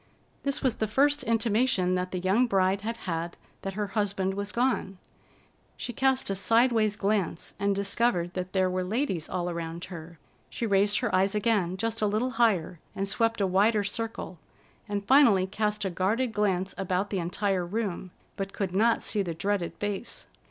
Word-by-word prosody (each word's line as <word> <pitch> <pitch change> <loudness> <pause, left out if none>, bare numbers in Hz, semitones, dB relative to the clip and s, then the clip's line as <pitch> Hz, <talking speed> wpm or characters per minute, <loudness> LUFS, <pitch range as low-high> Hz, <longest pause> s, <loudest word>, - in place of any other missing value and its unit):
This 280 -1 -1
was 260 -4 +1
the 220 - 0
first 285 +7 +2
intimation 225 -4 +2
that 180 0 -1
the 185 - -4
young 195 +7 +2
bride 195 -1 +2
had 230 +2 -3
had 170 -1 -3 0.2
that 195 - -4
her 210 0 -1
husband 195 -1 0
was 200 +1 -4
gone. 235 -6 0 0.8
She 240 - -5
cast 265 -5 +1
a - - -1
sidewise 225 +1 +3
glance 200 -5 -1
and 200 0 +1
discovered 200 -3 0
that 185 0 -4
there 190 -1 +2
were 185 0 -1
ladies 190 - -2
all 180 -1 -2
around 170 0 -4
her. 165 0 -9 0.3
She 235 - -3
raised 205 +1 +3
her 240 -5 -1
eyes 195 +2 +2
again, 205 -4 +1
just 225 +2 -2
a 210 - +3
little 220 +5 0
higher, 210 -8 +1 0.2
and 195 0 -2
swept 225 +2 +1
a - - +3
wider 205 +3 +3
circle, 205 -4 -4 0.5
and 200 -1 -2
finally 230 -8 +6
cast 210 +1 -1
a 190 - -1
guarded 220 +7 0
glance 195 -3 0
about 190 +1 -1
the 195 - 0
entire 185 +2 0
room, 190 -1 -3 0.3
but 195 -1 -4
could 190 -3 -3
not 230 +3 +3
see 210 - 0
the 170 -4 -3
dreaded 190 0 -1
face. 205 +2 -4
200 Hz, 180 wpm, -28 LUFS, 185-225 Hz, 0.8 s, finally